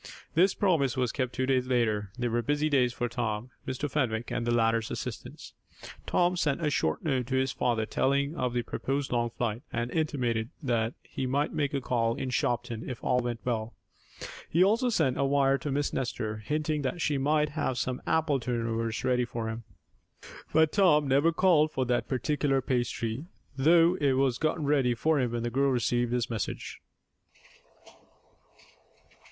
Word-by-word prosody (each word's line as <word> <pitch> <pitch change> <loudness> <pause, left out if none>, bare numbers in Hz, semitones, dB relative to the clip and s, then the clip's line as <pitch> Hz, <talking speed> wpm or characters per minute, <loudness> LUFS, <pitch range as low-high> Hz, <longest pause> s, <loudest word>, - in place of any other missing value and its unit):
This 185 +4 +4
promise 145 -10 +1
was 125 -3 +1
kept 130 -3 -2
two 130 - -1
days 130 -1 +1
later. 110 -5 +1
They 120 -1 -1
were 120 0 0
busy 145 +5 0
days 130 -4 +3
for 120 0 -2
Tom, 120 0 -3 0.2
Mr. 130 +3 -2
Fenwick 120 -6 -1
and 115 - -2
the - - +2
latter's 115 -1 +2
assistants. - - -7 0.5
Tom 175 +1 +2
sent 160 -1 0
a 150 - +1
short 80 - 0
note 130 -5 0
to 130 - -1
his 130 0 +1
father 115 -4 0
telling 140 +6 0
of 125 -4 -1
the 120 - 0
proposed 135 +3 -3
long 120 -1 +1
flight, 115 -1 -3
and 120 +1 -2
intimated 120 -8 -1
that 115 -3 0
he 130 - -4
might 140 +3 0
make 145 -2 0
a 140 - -1
call 115 -2 0
in 130 - -4
Shopton 120 -1 -1
if 125 - -7
all 125 - +2
went 120 -1 -3
well. 115 -2 -2 0.7
He 170 +3 +4
also 230 +6 +3
sent 160 - +1
a - - +3
wire 135 0 +3
to 145 - -4
Miss 145 +1 -1
Nestor, 115 -4 -2
hinting 150 +6 -2
that 140 +6 -2
she 150 -4 0
might 150 +2 +2
have 140 -4 -2
some 130 0 -2
apple 155 -4 +2
turnovers 115 -2 -2
ready 125 -1 +2
for 115 -1 -4
him. 115 0 -6 0.9
But 160 0 +4
Tom 150 -8 +4
never 140 +5 +3
called 165 -3 +3
for 130 -3 -1
that 120 0 0
particular 135 +1 0
pastry, 120 0 -2 0.3
though 165 +5 +4
it 140 -2 +3
was 130 -2 +1
gotten 155 -1 0
ready 135 -4 +2
for 155 +5 +1
him 125 -3 0
when 120 -1 -2
the 120 - -2
girl 135 +3 +2
received 120 -1 +1
his 120 -1 0
message. 115 -6 -5
130 Hz, 180 wpm, -28 LUFS, 120-145 Hz, 0.9 s, This